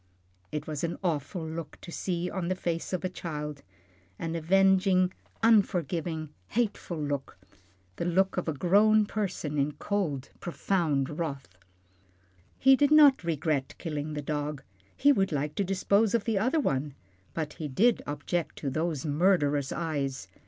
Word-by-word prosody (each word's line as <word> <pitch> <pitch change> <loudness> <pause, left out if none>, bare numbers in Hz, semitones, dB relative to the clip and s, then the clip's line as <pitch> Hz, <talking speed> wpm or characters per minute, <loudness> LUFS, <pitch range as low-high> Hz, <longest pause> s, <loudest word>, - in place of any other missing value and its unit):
It 150 -1 -3
was 155 -1 -4
an 170 0 -2
awful 165 0 -2
look 160 -1 -6
to 170 - -9
see 175 0 -2
on 180 -2 -3
the 185 - 0
face 170 -2 -3
of 185 0 -2
a - - +3
child, 150 -5 -5 0.6
an 165 0 -3
avenging, 185 +2 +3 0.3
unforgiving, 175 -7 +2 0.2
hateful 210 -6 -1
look, 145 - -3 0.6
the - - -2
look 190 +2 +2
of 180 - -2
a 160 - 0
grown 210 +7 +4
person 185 -8 -2
in 145 +2 +1
cold, 160 -11 -2
profound 160 -5 -1
wrath. 140 - -4 1.0
He 270 0 +6
did 285 +1 +3
not 290 -7 +7
regret 155 -4 -1
killing 155 -2 -4
the 150 -1 -4
dog, 150 0 -3 0.3
he 285 - +5
would 195 -9 +2
like 150 0 -1
to 200 - 0
dispose 200 +3 +2
of 230 - +1
the 220 -4 0
other 255 +9 +2
one, 140 - -1 0.4
but 155 -2 -3
he 155 - -2
did 220 - +3
object 150 +4 -2
to 140 - -3
those 155 -1 -2
murderous 145 -3 +2
eyes. 140 - -2
170 Hz, 150 wpm, -29 LUFS, 150-195 Hz, 1.0 s, not